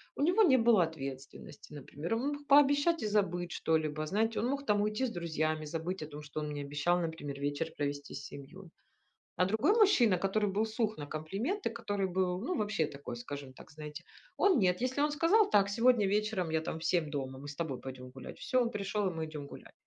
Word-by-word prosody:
у 285 - -1
него 360 +7 +4
не 275 -11 +6
было 225 -6 +5
ответственности. 140 -2 -7
Например, 150 +6 -4
он 245 +5 -1
мог 290 0 -9
пообещать 285 +3 +5
и - - 0
забыть 175 -4 0
что-либо, 155 -2 0
знаете, 220 +5 0
он 235 - 0
мог 280 +1 -2
там 205 -4 +2
уйти 215 +5 0
с 235 - -3
друзьями, 155 -2 -2
забыть 165 +4 -4
о 155 - -5
том, 150 0 -9
что 150 +1 -6
он 150 0 -3
мне 145 -1 -4
обещал, 145 +5 +1
например, 160 -4 -4
вечер 145 +3 -1
провести 145 0 -3
с - - -7
семьёй. 170 +6 -11 0.7
А 180 - +4
другой 220 - +2
мужчина, 260 - +5
который 205 +1 0
был 210 +3 +1
сух 220 0 -1
на 145 -1 -6
комплименты, 200 - -2
который 205 -4 -2
был 180 0 0
ну 320 - -2
вообще 205 -6 0
такой, 140 -4 -7
скажем 135 +2 -7
так, - - -14
знаете, 150 +2 -8 0.3
он 380 -10 +4
нет. 180 +2 +2
Если 255 +2 -1
он 295 0 +2
сказал: 375 +8 +4
"Так, 200 -1 +4
сегодня 230 0 +4
вечером, 205 -4 0
я 160 - +2
там 160 - -4
в 160 - -7
7 165 -4 +1
дома, 135 -2 -4
мы 145 - -9
с 145 - -7
тобой 150 -6 -3
пойдём 130 -1 -8
гулять". 130 0 -10
Всё, 255 -2 +1
он 235 - 0
пришёл 200 -1 -1
и - - -6
мы 160 -1 -3
идём 150 -2 -7
гулять. - - -12
180 Hz, 215 wpm, -32 LUFS, 150-225 Hz, 0.7 s, не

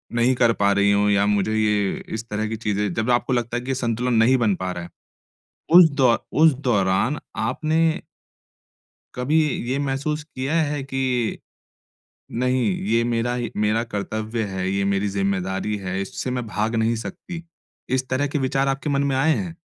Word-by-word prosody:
नहीं 120 +2 +3
कर 120 -2 +3
पा 100 -2 +2
रही 100 0 +3
हूँ 100 0 +3
या 100 0 +3
मुझे 105 +1 +1
ये 105 -2 +2 0.3
इस 115 +1 -7
तरह 105 +1 -2
की 110 - -2
चीज़ें 105 -3 -1
जब 110 +5 -1
आपको 120 +2 +1
लगता 120 0 -1
है 120 - -4
कि 130 - -8
ये - - 0
संतुलन 125 0 -1
नहीं 115 +3 +4
बन 110 -5 +2
पा 95 0 -3
रहा 90 -1 -5
है। 85 - -9 0.9
उस 175 -2 +9
दौ 125 -3 +5 0.3
उस 160 -2 +7
दौरान 100 +5 +2 0.2
आपने 155 0 0 1.4
कभी 140 +6 +1
इ - - -3
ये 130 - 0
महसूस 145 +2 -2
किया 140 -1 -4
है 145 -2 -2
कि, 130 -4 -1 0.9
नहीं 125 +2 +1 0.3
ये 115 +1 +3
मेरा 120 0 0
ही 120 -2 -3
मेरा 105 +2 +1
कर्तव्य 110 +1 -3
है, 95 -2 -3
ये 100 0 0
मेरी 100 +1 +1
ज़िम्मेदारी 95 +1 -1
है, 95 -1 -4
इससे 110 +6 -4
मैं 125 -2 -2
भाग 110 +2 -1
नहीं 115 +1 +1
सकती। 170 +7 -7 0.5
इस 130 0 0
तरह 130 +3 +1
के 145 - -2
विचार 135 +1 0
आपके 135 +2 -1
मन 140 0 +1
में - - 0
आए 150 +4 +3
हैं? 170 -3 -4
115 Hz, 185 wpm, -23 LUFS, 105-130 Hz, 1.4 s, उस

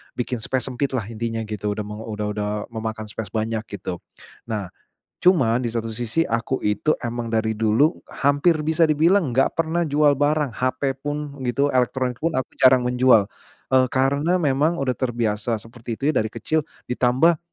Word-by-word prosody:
bikin 125 -1 -2
space 130 +2 -1
sempit 135 +1 -2
lah 115 - -1
intinya 115 0 -3
gitu. 105 -1 -5
Udah 105 - -3
mau 105 +1 -7
udah 105 -1 -3
udah 105 0 -2 0.2
memakan 110 -1 -4
space 110 0 -5
banyak 110 0 -1 0.2
gitu. 90 -3 -5 0.5
Nah, 105 -5 -4 0.5
cuman 130 -10 +4
di 120 - -1
satu 115 -1 -3
sisi 120 +8 0
aku 115 +3 -1
itu 105 +9 +1
emang 120 -1 -4
dari 110 0 0
dulu 115 +9 +3 0.2
hampir 145 +4 +2
bisa 160 +1 +2
dibilang 165 +1 +3
enggak 130 +3 +2
pernah 165 +1 0
jual 145 -1 +3
barang 145 -1 +2
hape 130 +1 -1
pun 145 0 -5
gitu 140 +4 +1
elektronik 125 0 0
pun 165 0 -1
aku 130 -1 -2
jarang 130 -1 +6
menjual, 125 -2 +4 0.5
eee, 130 -1 +5
karena 140 +6 +1
memang 145 +4 +2
udah 130 -2 0
terbiasa 115 -3 -1
seperti 115 0 -7
itu 110 - -19
ya - - -3
dari 110 - +1
kecil 155 -1 -1 0.2
ditambah, 130 +7 +3
125 Hz, 170 wpm, -23 LUFS, 115-145 Hz, 0.5 s, jarang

